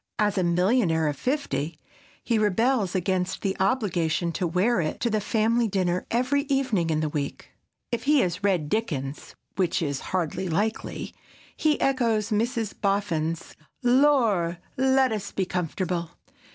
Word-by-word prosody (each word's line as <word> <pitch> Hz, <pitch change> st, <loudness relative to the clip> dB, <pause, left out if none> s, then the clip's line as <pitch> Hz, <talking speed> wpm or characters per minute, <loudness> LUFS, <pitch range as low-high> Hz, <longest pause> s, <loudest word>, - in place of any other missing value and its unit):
As 210 Hz, -1 st, +2 dB
a 185 Hz, -, +1 dB
millionaire 175 Hz, -2 st, +2 dB
of 145 Hz, -, -1 dB
fifty, 165 Hz, -, -2 dB, 0.5 s
he 230 Hz, -3 st, +1 dB
rebels 215 Hz, -1 st, +1 dB
against 185 Hz, 0 st, -1 dB
the 195 Hz, -1 st, 0 dB
obligation 180 Hz, -6 st, +1 dB
to 175 Hz, +1 st, -1 dB
wear 185 Hz, +5 st, +2 dB
it 155 Hz, -, -3 dB
to 235 Hz, -, +1 dB
the 215 Hz, -1 st, +1 dB
family 225 Hz, +3 st, +2 dB
dinner 185 Hz, -3 st, -1 dB
every 255 Hz, +4 st, +1 dB
evening 255 Hz, -11 st, +1 dB
in 155 Hz, -1 st, +1 dB
the 155 Hz, -, 0 dB
week. 145 Hz, -1 st, -4 dB, 0.4 s
If 235 Hz, 0 st, -2 dB
he 295 Hz, -1 st, +5 dB
has 180 Hz, +2 st, -2 dB
read 185 Hz, -7 st, +1 dB
Dickens, 150 Hz, -9 st, -3 dB, 0.2 s
which 185 Hz, -2 st, +1 dB
is 140 Hz, -5 st, -2 dB
hardly 185 Hz, 0 st, -1 dB
likely, 210 Hz, +7 st, -2 dB, 0.4 s
he 305 Hz, -1 st, +1 dB
echoes 230 Hz, -6 st, +1 dB
Mrs. 225 Hz, 0 st, 0 dB
Boffin's 170 Hz, -6 st, -1 dB, 0.3 s
"Lor'! 240 Hz, -10 st, +3 dB, 0.2 s
let 265 Hz, 0 st, +3 dB
us 205 Hz, -2 st, -3 dB
be 190 Hz, -, -1 dB
comfortable!" 180 Hz, -1 st, -2 dB
195 Hz, 145 wpm, -26 LUFS, 170-235 Hz, 0.5 s, he